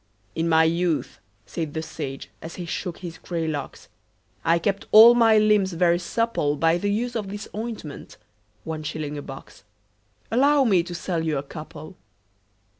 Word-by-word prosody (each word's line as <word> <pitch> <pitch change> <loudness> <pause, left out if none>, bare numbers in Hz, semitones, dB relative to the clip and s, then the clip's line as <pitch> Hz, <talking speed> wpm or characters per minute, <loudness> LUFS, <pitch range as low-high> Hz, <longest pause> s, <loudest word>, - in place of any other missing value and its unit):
"In 165 +1 -1
my 160 0 +5
youth," 165 0 0 0.3
said 160 -3 -5
the 160 - -2
sage, 135 -3 -7
as 165 +1 -8
he 180 - -6
shook 170 +1 -4
his 170 -3 -8
grey 165 -2 -3
locks, 145 -3 -5 0.6
"I 165 +1 +3
kept 195 +4 -2
all 225 +3 +10
my 225 -2 +5
limbs 210 -3 +3
very 170 0 +2
supple 180 -6 -1
By 165 +3 +2
the 205 - -1
use 240 +4 -1
of 210 -4 -3
this 205 +1 -6
ointment 215 -9 -7 0.5
one 160 -1 -5
shilling 150 -1 -4
a 145 - -5
box 135 -8 -11 0.7
Allow 280 +4 +4
me 195 -8 +4
to 175 +1 -7
sell 170 -1 -2
you 155 -3 0
a 135 - -3
couple?" 155 +3 -10
170 Hz, 170 wpm, -24 LUFS, 160-205 Hz, 0.7 s, all